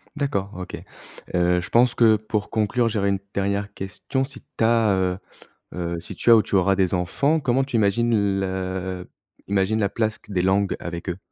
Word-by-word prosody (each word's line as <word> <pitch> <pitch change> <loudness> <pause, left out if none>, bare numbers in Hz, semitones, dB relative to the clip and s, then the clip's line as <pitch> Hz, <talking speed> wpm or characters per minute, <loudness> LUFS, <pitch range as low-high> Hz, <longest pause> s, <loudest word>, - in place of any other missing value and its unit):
D'accord 100 -10 -2
OK. 90 - -6 0.6
Heu, 90 0 +3
je 85 - -6
pense 120 +1 +4
que 115 -2 +5
pour 105 -1 -3
conclure, 115 +2 +1
j'aurais 105 -3 0
une 100 -1 0
dernière 100 +1 -1
question, 105 +7 -3
si 140 - -7 0.2
tu - - +1
as 115 -3 +4
heu 90 -1 0 0.6
heu, 85 -1 -3
si 85 - -8
tu - - +2
as 115 - +10
ou 110 - +4
tu - - -5
auras 95 0 +3
des 95 -2 +1
enfants, 140 - +1
comment 135 -1 +1
tu 135 -3 -2
imagines 105 -1 +2
le 95 -1 -3 0.4
imagines 100 +2 +1
la 100 - +2
place 110 +1 -1
q 105 - -20
des 90 - +1
langues 95 +1 +1
avec 85 +1 -6
eux? 90 +1 -3
100 Hz, 195 wpm, -23 LUFS, 95-115 Hz, 0.6 s, as